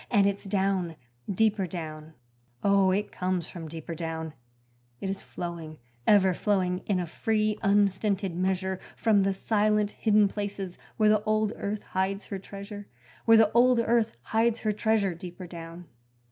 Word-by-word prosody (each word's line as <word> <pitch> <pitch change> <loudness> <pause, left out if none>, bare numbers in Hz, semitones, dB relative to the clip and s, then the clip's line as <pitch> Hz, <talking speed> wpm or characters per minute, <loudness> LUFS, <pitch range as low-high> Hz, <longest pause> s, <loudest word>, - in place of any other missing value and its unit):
And 205 -4 +4
it's 200 +1 0
down, 190 -4 0 0.4
deeper 210 -1 +2
down 155 -2 -7 0.5
Oh, 200 -1 +4
it 200 +3 0
comes 180 -1 -2
from 165 -3 -8
deeper 160 +1 -7
down; 160 -1 -4 0.7
It 195 - -2
is 195 - -5
flowing, 165 -3 -6 0.3
ever 190 -3 +5
flowing, 185 -2 0
in 195 -3 +1
a 180 - -1
free, 215 +4 0
unstinted 200 -1 +2
measure 190 +1 -1 0.2
From 215 -3 +3
the 195 0 +2
silent 210 +1 +1
hidden 210 -2 +3
places 200 -2 -5 0.2
where 215 -1 +4
the 210 -1 +4
old 215 0 +1
earth 205 +1 -4
hides 190 +2 -2
her 195 - -5
treasure 200 +1 -9 0.4
Where 225 -1 +7
the 220 -1 +5
old 245 +1 +5
earth 230 -1 +1
hides 225 +1 +1
her 215 - +1
treasure 210 -3 +1
deeper 175 +2 -8
down. 170 0 -9
195 Hz, 155 wpm, -28 LUFS, 180-215 Hz, 0.7 s, Where